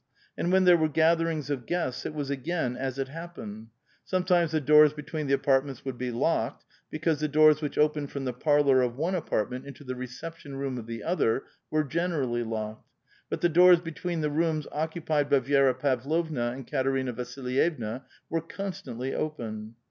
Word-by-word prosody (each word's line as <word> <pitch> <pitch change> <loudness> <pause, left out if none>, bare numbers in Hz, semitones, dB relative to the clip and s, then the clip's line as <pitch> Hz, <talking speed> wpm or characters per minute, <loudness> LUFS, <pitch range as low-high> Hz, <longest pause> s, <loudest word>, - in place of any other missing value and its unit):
And 175 - -1
when 190 0 +5
there 180 -1 +7
were 160 -1 +1
gatherings 160 -2 +2
of 130 -4 -3
guests, 165 -8 -2
it 155 - -7
was 145 -2 -3
again 140 -2 -2
as 130 0 -3
it 135 -1 -2
happened; 135 -10 -8 0.4
sometimes 180 -2 +2
the 155 0 +1
doors 150 +1 +6
between 150 0 -5
the 140 - +4
apartments 135 -1 0
would 130 -3 -5
be 125 0 -2
locked, 120 +1 -1 0.2
because 155 -1 0
the 155 0 -1
dooi 155 +1 +7
s 150 +1 -2
which 145 -2 -4
opened 150 -1 +2
from 140 -1 -5
the 125 - -2
parlor 140 0 +3
of 120 -1 0
one 165 +6 0
apartment 130 - -1
into 140 +1 -10
the 130 -2 -4
reception 135 +4 -8
room 135 -2 -3
of 115 - -9
the 115 -2 -6
other 150 -8 +1 0.3
were 155 0 +2
generally 145 -6 -1
locked; 110 -1 -5 0.4
but - - -3
the 175 - +4
doors 180 +1 +7
between 165 0 -4
the 150 -1 0
rooms 155 -1 0
occupied 155 -2 -1
by 140 -1 +5
Vi^ra 135 0 +3
Pavlovna 140 0 0
and 135 0 -8
Katerina 135 -1 0
Vasilyevna 125 0 -2 0.3
were 165 - -1
constantly 145 -9 -5
open. 110 -7 -4
145 Hz, 180 wpm, -28 LUFS, 125-160 Hz, 0.4 s, there